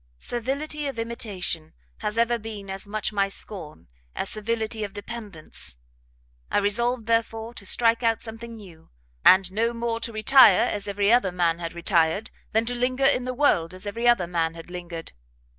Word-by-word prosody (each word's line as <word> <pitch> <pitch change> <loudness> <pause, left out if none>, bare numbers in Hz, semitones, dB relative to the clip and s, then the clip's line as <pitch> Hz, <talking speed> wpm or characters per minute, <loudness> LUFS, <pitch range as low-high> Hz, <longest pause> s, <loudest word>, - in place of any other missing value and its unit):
Servility 280 - -3
of 275 - -5
imitation 200 -8 -4 0.3
has 210 +1 -3
ever 235 0 +2
been 210 -3 -7
as 195 +1 -4
much 215 +1 -2
my 200 -1 +1
scorn 160 - -5 0.3
as 195 - -1
servility 220 0 -2
of 200 -2 -5
dependence; 205 - -7 0.7
I - - +1
resolved, 230 +4 +2
therefore, 230 0 0
to 200 -4 -5
strike 230 +2 +3
out 230 -2 +2
something 230 +1 -8
new, 180 -7 -14 0.3
and 185 0 +6
no 230 +4 0
more 230 0 -2
to 230 0 -4
retire 225 +5 +6
as 205 0 -3
every 200 +1 +2
other 235 -6 +4
man 170 -2 +1
had 165 -1 -5
retired, 170 +3 +1 0.2
than 225 +1 +2
to 245 - -2
linger 255 +2 0
in 265 -2 +3
the 255 0 -3
world 185 - +2
as 185 - -8
every 230 +4 -1
other 240 -7 +4
man 165 -1 -1
had 165 +1 -10
lingered. 175 -2 -7
215 Hz, 175 wpm, -25 LUFS, 185-235 Hz, 0.7 s, and